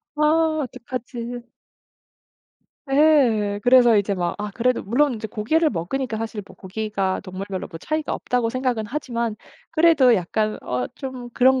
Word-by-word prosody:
아 300 - -2 0.4
어떡하지.' 245 -1 -7 1.4
예. 250 -9 +3
그래서 245 -2 +6
이제 200 0 0
막 175 -2 -1
아 210 0 -4
그래도 250 +1 +1
물론 255 +6 +2
이제 220 -1 -5
고기를 305 +10 +1
먹으니까 220 +7 -3
사실 220 -1 -4
뭐 190 - -14
'고기가 195 -1 -2
동물별로 190 0 -6
뭐 165 - -9
차이가 310 - -2
없다.'고 245 -2 -1
생각은 250 -3 -1
하지만 235 -4 -3 0.3
그래도 315 -6 +5
약간 215 +3 -1
어 125 0 -2
좀 255 -3 -7
그런 260 +2 +4
235 Hz, 305 characters per minute, -23 LUFS, 205-260 Hz, 1.4 s, 그래서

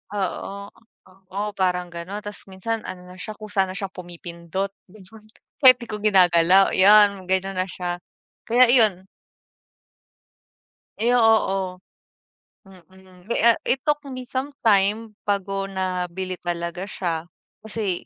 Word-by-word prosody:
oo, 200 +1 -4 0.6
oo, 205 +1 -2
parang 180 -1 0
gano'n, 180 +5 -6
ta's 205 0 -8
minsan 205 +4 -4
ano 180 -1 -8
na 185 - -13
siya, 215 - -6
kusa 205 -2 -1
na 185 - -6
siya 195 -1 -4
pumipindot, 175 +2 -6 0.2
ganun, 210 +2 -16 0.3
kahit 255 -3 +9
‘di 235 - -8
ko 210 - -4
ginagalaw. 185 -2 +5
'Yan, 200 -1 +5
gano'n 190 0 -1
na 185 - 0
siya. 175 -1 -4 0.5
Kaya 245 +1 +5
iyon. 210 -7 +3 1.9
Ay, 235 +3 +1
oo, 195 -6 +2 0.9
mm. 185 0 -19
Mi 235 - -2
a 235 0 +5
it 260 0 0
took 295 -1 +1
me 255 -2 -6
some 260 +3 -4
time 210 0 +2
bago 195 -1 -1
nabili 185 -1 -3
talaga 175 +1 -4
siya. 170 -5 -3 0.4
Kasi 205 -5 -3
195 Hz, 130 wpm, -23 LUFS, 180-215 Hz, 1.9 s, kahit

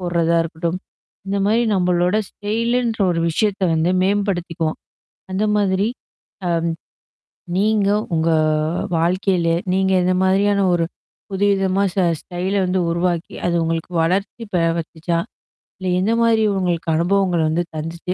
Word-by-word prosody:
போட்றதா 170 -2 +1
இருக்கட்டும். 165 +2 -3 0.5
இந்த 200 +1 -1
மாரி 225 +3 +3
நம்மளோட 180 +1 +2
ஸ்டைலுன்ற 230 +2 -1
ஒரு 165 -1 0
விஷயத்த 200 +3 0
வந்து 160 +3 +1
மேம்படுத்திக்குவோம். 175 -5 -1 0.5
அந்த 195 +3 0
மாதிரி. 200 +1 +1 0.6
அ. - - +1 1.1
நீங்க 205 0 +2 0.2
உங்க 160 +1 +1 0.7
வாழ்க்கையில, 175 0 +1 0.2
நீங்க 190 0 +2
இந்த 185 +1 +2
மாதிரியான 200 +1 +2
ஒரு 170 -1 +1 0.4
புது 195 +1 0
விதமா 195 0 +1
ஸ - - -15 0.2
ஸ்டைல 180 +3 -3
வந்து 185 +1 0
உருவாக்கி, 170 0 -1
அது 170 - +1
உங்களுக்கு 165 +1 -2
வளர்ச்சி 195 +7 -1 0.4
வந்துச்சா? 165 +1 -3 0.6
இல்ல 185 -1 -2
எந்த 205 +5 +1
மாதிரி 225 -1 +3
உங்களுக்கு 175 -3 -1
அனுபவங்கள் 175 -1 +2
வந்து 165 +3 0
தந்துச்சு? 165 +3 -4
185 Hz, 120 wpm, -20 LUFS, 170-200 Hz, 1.1 s, மாரி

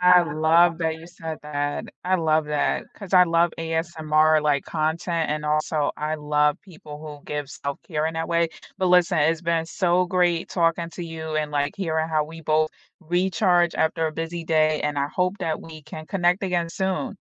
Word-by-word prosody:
I 180 0 +7
love 165 +2 +3
that 160 -1 -1
you 165 +1 -12
said 165 -2 -7
that. 145 -1 -2 0.2
I 185 +1 +2
love 160 -2 +2
that, 150 -1 0
'cause 200 -2 -5
I 180 - +9
love 170 0 +2
ASMR, 160 -1 +2
like, 145 -2 +1
content 160 +1 -1
and 150 0 -2
also, 150 0 0
I 155 +1 -2
love 150 0 +1
people 155 -5 -11
who 150 -2 -10
give 145 -2 -4
self-care 150 +2 -4
in 160 - -3
that 165 +1 -3
way. 170 -1 +2 0.3
But 185 - 0
listen, 180 -1 +4
it's 160 +2 +2
been 170 -2 0
so 175 +2 +1
great 175 -2 +1
talking 170 -1 +1
to 175 - -7
you 160 -1 -6
and, 150 -1 -1
like, 145 -1 -1
hearing 160 -4 -1
how 155 -2 +1
we 165 +1 -11
both 155 0 +2 0.3
recharge 175 0 +2
after 160 0 +1
a 155 - -3
busy 165 +2 -4
day, 155 -1 +2
and 150 -1 -1
I 140 - 0
hope 185 +5 -1
that 165 -5 -2
we 155 -1 -11
can 155 +1 -9
connect 180 -1 +1
again 175 -3 0
soon. 190 +2 -2
160 Hz, 190 wpm, -24 LUFS, 155-175 Hz, 0.3 s, I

